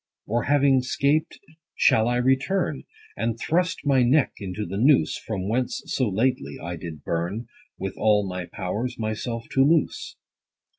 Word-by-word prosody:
Or 115 +2 -1
having 140 -2 +4
'scaped 140 +4 0 0.4
shall 110 +1 +4
I 120 - +1
return, 135 +6 0 0.3
And 115 0 -2
thrust 180 +5 0
my 135 -2 +4
neck 130 +4 +3
into 100 +1 -4
the 95 +3 -5
noose, 135 +4 +4
From 110 -6 -4
whence 125 +4 -1
so 130 -5 0
lately, 100 - -1
I 85 0 -5
did 80 -3 -8
burn, 90 +8 -2 0.3
With 95 0 -4
all 105 -1 +3
my 90 -1 -4
powers, 105 +6 -4
myself 115 +1 -3
to 135 - +4
loose 155 +3 +1
115 Hz, 150 wpm, -25 LUFS, 100-135 Hz, 0.4 s, having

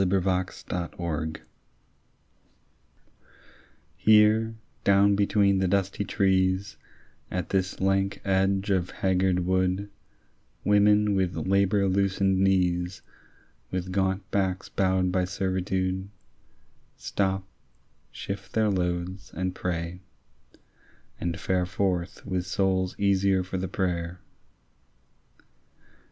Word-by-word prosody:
BEFORE 95 0 +2
A 95 0 +1
CRUCIFIX 85 -3 -4 2.6
HERE, 110 +1 +4 0.3
down 100 0 +4
between 100 -1 +3
the 95 - +1
dusty 100 +1 0
trees, 95 -1 +1 0.5
At 90 -2 -3
this 95 -1 -1
lank 95 +1 +1
edge 95 +1 +1
of 90 -2 +1
haggard 95 -1 +1
wood, 95 +2 0 0.7
Women 105 0 +4
with 95 -2 0
labour 100 +1 +2
loosened 95 0 +1
knees, 90 -1 +1 0.7
With 95 0 -3
gaunt 95 +1 0
backs 95 -1 -1
bowed 95 -1 +1
by 90 0 +1
servitude, 95 0 -2 0.9
Stop, 95 -1 -1 0.6
shift 100 - -7
their 110 -2 +2
loads, 90 0 -2
and 90 +1 -2
pray, 85 -1 -3 1.2
and 85 -1 -3
fare 90 -1 0
Forth 90 -2 -2
with 90 -1 -2
souls 95 -1 0
easier 100 -1 +2
for 95 0 -4
the 95 - -2
prayer. 90 -1 -2
95 Hz, 95 wpm, -27 LUFS, 90-100 Hz, 2.6 s, HERE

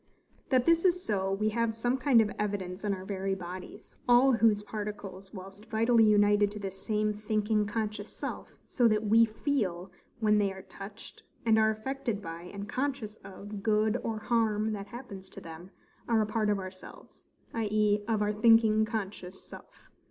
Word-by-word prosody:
That 255 -2 +3
this 335 0 +4
is 360 -1 +3
so, 195 -3 0
we 215 +2 +1
have 230 0 0
some 245 +2 0
kind 255 -3 +4
of 210 -1 0
evidence 195 -3 -3
in 205 - 0
our 190 -1 -4
very 195 -1 -2
bodies, 185 0 -9 0.2
all 245 +3 +6
whose 225 -3 +3
particles, 205 -3 -6
whilst 195 +2 -11
vitally 230 +1 +4
united 205 -1 +4
to 210 - -6
this 190 -1 -6
same 215 0 0
thinking 210 0 0
conscious 215 0 -3
self, - - -7
so 245 -3 +2
that 215 -1 +2
WE 225 +2 +6
FEEL 215 - -2 0.3
when 210 -2 +3
they 200 -1 +1
are 190 0 -9
touched, 200 +2 -11 0.2
and 220 -1 +4
are 220 0 +4
affected 230 0 -3
by, 170 -2 -8
and 200 0 -6
conscious 255 -4 -3
of 200 +1 -9
good 215 +1 +2
or 225 -1 -2
harm 220 -1 +1
that 200 -1 -6
happens 200 -6 -9
to - - -10
them, 165 +3 -10 0.4
are 225 -2 +3
a - - -1
part 215 0 0
of 205 - +2
ourselves; 185 -1 -10 0.3
i.e. 210 -1 +1
of 220 -2 +1
our 210 - +1
thinking 220 0 +5
conscious 200 -4 -5
self. - - -14
210 Hz, 175 wpm, -30 LUFS, 200-225 Hz, 0.4 s, all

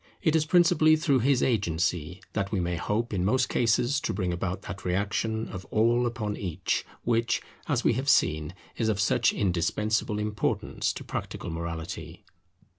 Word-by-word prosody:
It 160 -4 +3
is 155 -1 +2
principally 170 -2 +5
through 150 -4 +2
his 130 +1 +2
agency 90 - 0
that 100 -2 -2
we 100 - 0
may 90 0 -1
hope 105 +6 -1
in 90 -2 0
most 130 +6 +2
cases 120 +4 +2
to - - -2
bring 90 -3 -1
about 90 +2 -3
that 95 - -7
reaction 105 +4 -1
of 95 -1 -7
All 120 +2 +2
upon 110 -3 -3
Each, 90 -6 -2 0.2
which, 115 0 +1 0.3
as 130 -5 0
we - - +4
have 135 +4 -1
seen, 80 - +2 0.2
is 110 -2 +1
of 105 -3 0
such 95 - +3
indispensable 105 +4 0
importance 105 0 -1
to - - -7
practical 85 - -5
morality. 80 0 -6
105 Hz, 165 wpm, -27 LUFS, 90-120 Hz, 0.3 s, principally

